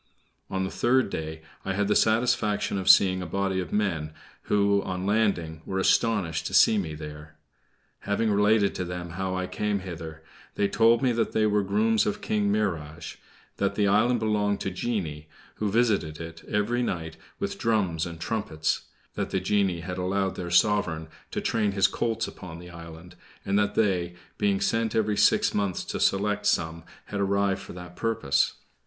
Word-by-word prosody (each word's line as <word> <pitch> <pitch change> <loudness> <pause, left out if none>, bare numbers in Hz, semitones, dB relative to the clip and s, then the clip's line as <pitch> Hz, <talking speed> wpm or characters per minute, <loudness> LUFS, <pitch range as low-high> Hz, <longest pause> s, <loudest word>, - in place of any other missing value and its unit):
On 95 0 -1
the 95 - -3
third 120 -3 +2
day, 80 0 -5 0.2
I 95 - -2
had 100 +1 0
the 105 - +2
satisfaction 110 -3 +2
of 95 0 0
seeing 95 -1 +6
a 90 - -5
body 95 +2 -1
of 90 -4 -4
men, 85 -7 -1 0.3
who, 100 -1 +3
on 95 -1 -4
landing, 95 -7 0
were 95 - -4
astonished 95 -4 +1
to - - -3
see 110 - +6
me 80 -5 -4
there. 75 0 -9 0.6
Having 105 +2 0
related 105 0 +3
to 90 - -3
them 90 -1 -6
how 95 +2 -3
I 95 0 -1
came 105 +1 -2
hither, 80 -3 -8 0.3
they 100 - +2
told 115 +4 +4
me 130 - +3
they 115 -1 +1
were 105 -1 +2
grooms 105 +3 +2
of 105 - -1
King 105 -1 0
Mihrage; 85 -7 -2 0.4
that 100 0 0
the 105 -1 +2
island 115 +5 +3
belonged 105 -2 0
to 95 - -2
genii, 90 -8 -3 0.3
who 105 - -1
visited 100 -9 +1
it 80 0 -8
every 110 +3 0
night 80 -8 -3 0.2
with 200 0 -4
drums 95 -9 +1
and 85 -1 -8
trumpets; 80 -5 -2 0.3
that - - -3
the 95 - 0
genii 95 -2 +1
had 90 +2 -5
allowed 95 +1 0
their 90 -1 -5
sovereign 85 -3 +2 0.2
to - - -3
train 105 -3 0
his 100 -1 +3
colts 115 -1 0
upon 85 -3 -9
the 90 +1 -11
island; 85 +1 -11 0.3
and 100 +1 +2
that 105 0 0
they, 90 -5 +1 0.2
being 200 -1 +1
sent 115 - 0
every 110 -1 +1
six - - +3
months 100 -3 -1
to - - -4
select 105 +1 +1
some, 80 -3 0 0.2
had 100 - -5
arrived 100 0 +1
for - - -10
that 90 0 -10
purpose. 110 -11 +1
100 Hz, 175 wpm, -26 LUFS, 85-105 Hz, 0.6 s, seeing